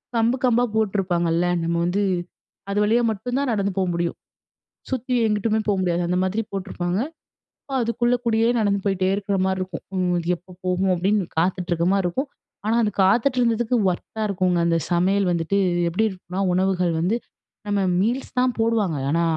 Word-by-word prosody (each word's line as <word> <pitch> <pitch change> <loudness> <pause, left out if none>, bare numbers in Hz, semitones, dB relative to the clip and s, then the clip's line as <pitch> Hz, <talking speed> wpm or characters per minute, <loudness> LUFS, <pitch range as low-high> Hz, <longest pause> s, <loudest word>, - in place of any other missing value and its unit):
கம்பு 230 +2 +2
கம்பா 245 -1 +3
போட்டுருப்பாங்கல்ல, 180 -5 +1 0.2
நம்ம 170 +1 0
வந்து 185 +4 0 0.7
அது 200 - -2
வழியா 225 +3 +3
மட்டும் 245 +5 -3
தான் 280 -2 0
நடந்து 200 -2 0
போ 190 - +2
முடியும். 170 0 -2 0.7
சுத்தி 255 -1 -2
எங்கிட்டுமே 215 +1 +1
போ - - +4
முடியாது. 175 -1 0
அந்த 180 +1 +1
மாதிரி 200 +4 -1
போட்டிருப்பாங்க. 185 -1 -2 0.6
அப்போ 275 - -5
அதுக்குள்ளகூடியே 235 -1 +1
நடந்து 200 -2 +1
போயிட்டே 190 -2 +1
இருக்கிற 200 -1 -1
மாரி 190 0 0
இருக்கும். 185 -3 -6
ம் 180 -1 +1
அது 170 -1 -4
எப்போ 180 +2 -19
போகும் 185 +1 +1
அப்படீன்னு 195 +2 +1
காத்துட்டிருக்க 175 0 0
மாரி 195 -2 +1
இருக்கும். 265 - -2 0.4
ஆனால 220 +2 +2
அது 210 - +1
காத்துட்டிருந்ததுக்கு 240 +2 +2
ஒர்த்தா 220 +5 -6
இருக்குங்க. 180 -2 +1
அந்த 165 0 +2
சமையல் 185 +2 +2
வந்துட்டு 170 +3 0 0.3
எப்படி 185 +6 +1
இருக்கும்னா, 185 0 -6
உணவுகள் 180 -2 +1
வந்து 195 +7 +1 0.5
நம்ம 205 0 +1 0.2
மீல்ஸ் 240 +7 -2
தான் 250 -1 +2
போடுவாங்க. 220 -8 +1
ஆனா, 170 +2 +2
195 Hz, 160 wpm, -23 LUFS, 180-225 Hz, 0.7 s, போ